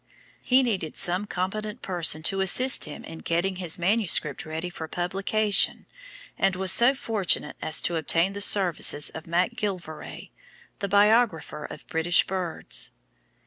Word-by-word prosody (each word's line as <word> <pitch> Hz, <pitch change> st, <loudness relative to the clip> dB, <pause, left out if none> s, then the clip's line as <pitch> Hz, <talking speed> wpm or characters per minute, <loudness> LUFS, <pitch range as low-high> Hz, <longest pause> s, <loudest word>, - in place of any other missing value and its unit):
He 260 Hz, +1 st, +3 dB
needed 190 Hz, -10 st, -3 dB
some 180 Hz, +4 st, +2 dB
competent 210 Hz, +5 st, -5 dB
person 165 Hz, -4 st, +2 dB
to 195 Hz, +3 st, 0 dB
assist 255 Hz, +8 st, +3 dB
him 150 Hz, -, -10 dB
in 165 Hz, -, -10 dB
getting 180 Hz, +3 st, -2 dB
his 175 Hz, -3 st, -2 dB
manuscript 175 Hz, -, 0 dB
ready 160 Hz, +3 st, -5 dB
for 160 Hz, -2 st, -8 dB
publication 195 Hz, +5 st, +1 dB, 0.5 s
and 195 Hz, -1 st, +1 dB
was 190 Hz, 0 st, +1 dB
so 245 Hz, +4 st, +5 dB
fortunate 205 Hz, -, 0 dB
as 155 Hz, -, +2 dB
to 170 Hz, -, -1 dB
obtain 165 Hz, +4 st, 0 dB
the 200 Hz, -, -6 dB
services 180 Hz, -7 st, +3 dB
of 160 Hz, -, -9 dB
MacGillivray, 180 Hz, -2 st, -4 dB, 0.5 s
the 200 Hz, -, -3 dB
biographer 205 Hz, -6 st, +1 dB
of -, -, -11 dB
British 160 Hz, +2 st, +2 dB
Birds. 185 Hz, -3 st, -2 dB
185 Hz, 140 wpm, -25 LUFS, 165-205 Hz, 0.5 s, so